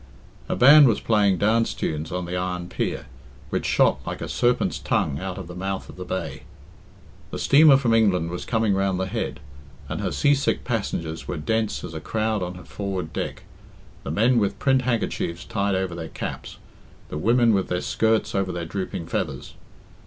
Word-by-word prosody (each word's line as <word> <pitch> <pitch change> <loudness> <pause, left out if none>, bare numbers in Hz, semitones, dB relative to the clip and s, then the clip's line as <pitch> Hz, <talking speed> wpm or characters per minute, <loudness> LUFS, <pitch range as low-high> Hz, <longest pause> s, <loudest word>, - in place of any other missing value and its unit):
A - - 0
band 145 +3 +8
was 115 - +2
playing 100 -4 +2
dance 115 +3 +2
tunes 80 0 -3
on 90 0 -3
the 90 +1 -4
iron 90 -1 -3
pier, - - -3 0.5
which - - -1
shot - - +3
like - - -5
a - - -5
serpent's 120 0 +1
tongue 70 - 0
out 95 0 -5
of 95 - -6
the 90 - -9
mouth 95 +1 -4
of - - -10
the 90 - -6
bay. 95 +1 -4 0.9
The - - -5
steamer 145 -1 +6
from 125 -4 +1
England 95 -7 +2
was 90 - -5
coming 110 -3 +1
round 95 -1 0
the 95 - 0
head, 110 +4 -3 0.5
and - - -4
her - - -1
sea 145 -1 +3
sick 140 -1 0
passengers 85 -9 -3
were 90 - -3
dense 110 +7 -1
as 85 - -7
a 80 - -4
crowd 110 +2 -1
on 90 0 -4
her 90 - -11
forward 95 -5 -4
deck, - - -4 0.6
the - - -5
men 115 - +3
with 100 -2 0
print 135 -1 +2
handkerchiefs 115 -8 -2
tied 100 -2 0
over 95 -2 -1
their 85 -1 -6
caps, - - -6 0.5
the - - -5
women 115 +4 +4
with 95 -2 +1
their 90 - -1
skirts 110 -1 +1
over 95 -2 0
their 85 -1 -4
drooping 90 -1 -4
feathers. - - -4
95 Hz, 190 wpm, -24 LUFS, 90-115 Hz, 0.9 s, band